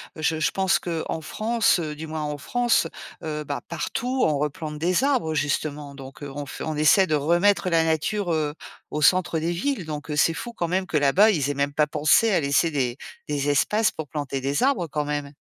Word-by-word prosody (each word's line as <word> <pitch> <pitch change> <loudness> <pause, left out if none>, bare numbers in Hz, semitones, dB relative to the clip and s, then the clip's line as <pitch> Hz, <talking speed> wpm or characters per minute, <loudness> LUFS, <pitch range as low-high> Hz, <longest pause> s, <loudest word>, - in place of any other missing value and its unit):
je 155 0 -1
je 155 - +1
pense 190 -1 +2
qu'en 165 -2 -3
France, 220 +4 +1
heu, 155 -3 -3
du 160 +2 -7
moins 155 0 -4
en 150 -1 -3
France, 240 +9 +1 0.4
heu, 150 -1 -3
bah 145 -1 -4
partout, 255 0 -2
on 150 -2 +1
replante 150 +1 -4
des 180 - +1
arbres, 255 - +1
justement. 145 -1 -2
Donc, 135 +1 -11
heu, 140 - -6
on 145 +1 -6
f - - -9
on 155 - -3
essaie 155 +6 +5
de 155 - +1
remettre 175 +6 +2
la 165 -2 +3
nature, 170 +4 0
heu, 150 -2 -1 0.4
au 150 - -2
centre 170 +1 +3
des 165 +2 -1
villes. 185 - -2
Donc 150 0 -6
c'est 165 +2 +3
fou 235 +8 -6
quand 175 -6 -2
même 185 +2 0
que 155 - 0
là-bas, 180 +10 +5
ils 145 -7 0
aient 145 - 0
même 140 +1 -1
pas 150 +1 +2
pensé 155 +10 +3
à 190 - +3
laisser 145 +3 +2
des 130 -4 -1 0.3
des 145 -1 -1
espaces 210 +10 +2
pour 160 - -7
planter 140 -1 -4
des 140 - 0
arbres 255 -11 +2
quand 150 +1 -2
même. 145 -1 -4
155 Hz, 215 wpm, -24 LUFS, 145-180 Hz, 0.4 s, essaie